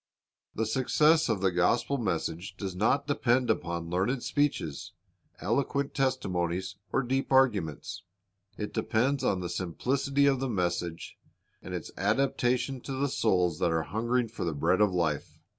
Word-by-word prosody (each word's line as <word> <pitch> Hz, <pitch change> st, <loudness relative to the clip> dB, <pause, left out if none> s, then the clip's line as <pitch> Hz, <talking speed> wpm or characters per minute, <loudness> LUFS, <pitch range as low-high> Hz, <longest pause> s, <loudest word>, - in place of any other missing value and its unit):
The 110 Hz, -, 0 dB
success 150 Hz, +7 st, +3 dB
of 105 Hz, -4 st, 0 dB
the 95 Hz, -1 st, +3 dB
gospel 115 Hz, +10 st, +1 dB
message 85 Hz, -4 st, -3 dB
does 95 Hz, -3 st, -4 dB
not 110 Hz, +8 st, +2 dB
depend 130 Hz, -3 st, +2 dB
upon 85 Hz, -1 st, -3 dB
learned 100 Hz, +8 st, 0 dB
speeches, 100 Hz, -, -1 dB, 0.5 s
eloquent 140 Hz, +6 st, 0 dB
testimonies, 95 Hz, -9 st, -1 dB, 0.2 s
or 135 Hz, -, +1 dB
deep 135 Hz, +3 st, -1 dB
arguments. 105 Hz, -, +1 dB, 0.6 s
It 105 Hz, -, -4 dB
depends 130 Hz, +5 st, +1 dB
upon 95 Hz, -2 st, +1 dB
the 90 Hz, -, -3 dB
simplicity 135 Hz, -, 0 dB
of 135 Hz, -2 st, +3 dB
the 135 Hz, 0 st, -2 dB
message 85 Hz, -4 st, -2 dB, 0.4 s
and -, -, -6 dB
its -, -, -6 dB
adapta 125 Hz, +4 st, +2 dB
tion 130 Hz, 0 st, -4 dB
to 135 Hz, -, -6 dB
the 140 Hz, +2 st, 0 dB
souls 90 Hz, -10 st, +1 dB
that -, -, +2 dB
are 80 Hz, -1 st, +1 dB
hungering 115 Hz, +8 st, 0 dB
for 115 Hz, -, -5 dB
the 85 Hz, -3 st, -2 dB
bread 85 Hz, +7 st, +2 dB
of 105 Hz, -2 st, +4 dB
life. 80 Hz, -5 st, -1 dB
110 Hz, 155 wpm, -29 LUFS, 90-130 Hz, 0.6 s, of